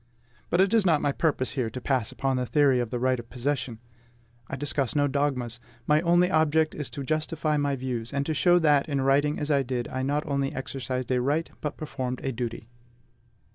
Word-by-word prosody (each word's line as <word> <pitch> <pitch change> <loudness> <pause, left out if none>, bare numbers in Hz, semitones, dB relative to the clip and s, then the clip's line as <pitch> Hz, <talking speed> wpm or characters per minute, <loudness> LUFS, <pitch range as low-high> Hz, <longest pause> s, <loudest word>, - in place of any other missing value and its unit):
But 175 - +1
it 195 +3 +4
is 225 -2 +5
not 165 -5 +3
my 145 - +2
purpose 140 -3 0
here 125 -5 -1
to 125 - -6
pass 125 -3 -1
upon 135 -1 -1
the 125 0 -1
theory 140 -3 +3
of 120 -2 -1
the 125 - -2
right 130 0 +1
of 120 0 -10
possession. 125 -2 -2 0.7
I - - -4
discuss 135 -3 -1
no 145 -1 +3
dogmas. 135 -4 -1 0.3
My 150 +1 +3
only 175 +1 +3
object 155 -1 +3
is 150 -3 -4
to 140 - -5
justify 155 +1 -1
my 145 -1 +1
views, 125 -3 -4
and 140 0 -1
to 160 - -1
show 175 +3 +4
that, 150 -3 +3
in 140 -2 0
writing 140 +3 +2
as 150 0 -2
I 140 -1 +4
did, 125 -2 -3
I 130 - -3
not 145 +3 0
only 140 -2 -1
exercised 130 -1 -4
a 125 -1 +2
right, 150 +6 0
but 150 - -4
performed 130 -4 -4
a 135 - -1
duty. 115 -2 -5
140 Hz, 215 wpm, -27 LUFS, 130-150 Hz, 0.7 s, is